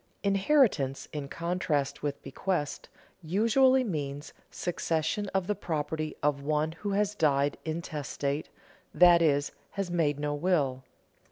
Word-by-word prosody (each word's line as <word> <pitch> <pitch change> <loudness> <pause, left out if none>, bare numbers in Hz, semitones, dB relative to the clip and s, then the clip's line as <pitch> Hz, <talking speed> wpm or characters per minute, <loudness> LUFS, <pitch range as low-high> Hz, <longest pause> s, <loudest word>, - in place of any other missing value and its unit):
_ - - -40 0.2
Inheritance, 195 - +2
in 145 -2 -4
contrast 165 -4 -1
with 145 -1 -3
bequest, 145 +2 -3 0.3
usually 230 +10 +3
means 145 - -4 0.2
succession 175 +3 -1
to 190 - +1
the 200 +3 -1
property 155 -4 -3
of 145 -1 +1
one 150 +2 0
who 200 +5 -4
has 205 +1 +1
died 145 -6 +1
intestate, 150 -2 -3 0.5
that 175 -1 +7
is, 145 -3 +2 0.2
has 195 -3 -3
made 150 -4 +1
no 145 0 -1
will. 145 -5 0
160 Hz, 125 wpm, -29 LUFS, 145-190 Hz, 0.5 s, that